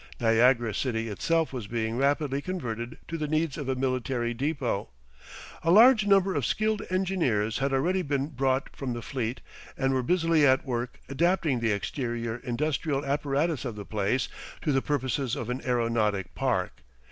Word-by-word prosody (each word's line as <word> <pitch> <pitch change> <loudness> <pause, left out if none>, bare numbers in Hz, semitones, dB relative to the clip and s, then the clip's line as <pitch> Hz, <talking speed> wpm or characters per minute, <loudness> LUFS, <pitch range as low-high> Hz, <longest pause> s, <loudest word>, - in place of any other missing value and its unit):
Niagara 115 0 +3
city 115 -2 -1
itself 165 +9 0
was 120 -6 -5
being 115 0 -2
rapidly 140 +1 +1
converted 120 -10 -4
to 165 - -4
the 150 - -1
needs 155 -1 0
of 140 -3 -5
a 130 - +1
military 130 -2 -1
depot. 130 - -2 0.7
A 165 - -1
large 215 +3 +7
number 195 -1 +4
of - - -1
skilled 215 -1 0
engineers 170 - 0
had 135 0 0
already 175 +8 +1
been 140 -3 -1
brought 135 -1 -1
from 130 -3 -3
the 120 -1 -6
fleet 125 -1 -3 0.4
and 135 0 +1
were 130 - +1
busily 165 +2 +2
at 130 -2 +4
work 120 -2 -3
adapting 160 -2 +1
the 115 -1 +1
exterior 115 +1 -2
industrial 140 +3 -1
apparatus 145 +2 0
of 120 -5 -4
the 100 -1 -7
place 110 +5 0 0.4
to 150 - +1
the 135 -1 +2
purposes 130 -3 -1
of 120 +1 -4
an 125 +2 -3
aeronautic 115 -6 0
park. - - -1
135 Hz, 165 wpm, -27 LUFS, 120-155 Hz, 0.7 s, large